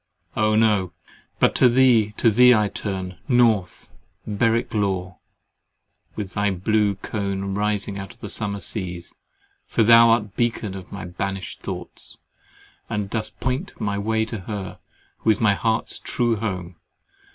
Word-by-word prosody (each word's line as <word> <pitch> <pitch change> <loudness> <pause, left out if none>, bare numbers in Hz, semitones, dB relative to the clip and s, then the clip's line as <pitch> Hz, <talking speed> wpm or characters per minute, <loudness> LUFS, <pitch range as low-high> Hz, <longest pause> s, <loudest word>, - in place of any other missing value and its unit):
Oh 110 0 +2
no! 105 -5 +2 0.4
But - - +3
to 125 - +6
thee, 120 -4 +4
to 115 - +4
thee 125 +3 +7
I 105 -2 +2
turn, 95 -4 -5
North 115 -8 +2 0.4
Berwick 115 +3 0
Law, 95 -3 -1 1.0
with 100 -4 -5
thy 105 0 +1
blue 100 +2 +1
cone 100 -1 -3
rising 105 -1 -1
out 95 - -8
of - - -3
summer 100 -2 -2
seas; 90 -3 -4 0.5
for 115 - +2
thou 115 +1 +7
art 115 -1 +4
the 105 - -13
beacon 115 -1 -1
of 95 -2 -9
my 100 - -6
banished 95 0 -5
thoughts, - - -6 0.7
and 105 -2 -3
dost 110 -2 -4
point 130 +8 -3
my 100 -1 -1
way 110 +2 0
to 110 -1 -6
her, 95 0 -6 0.4
who - - 0
is 105 - +3
my 105 -3 +4
heart's 110 +3 -1
true 120 -2 0
home. 90 -5 -4
105 Hz, 150 wpm, -23 LUFS, 95-115 Hz, 1.0 s, thee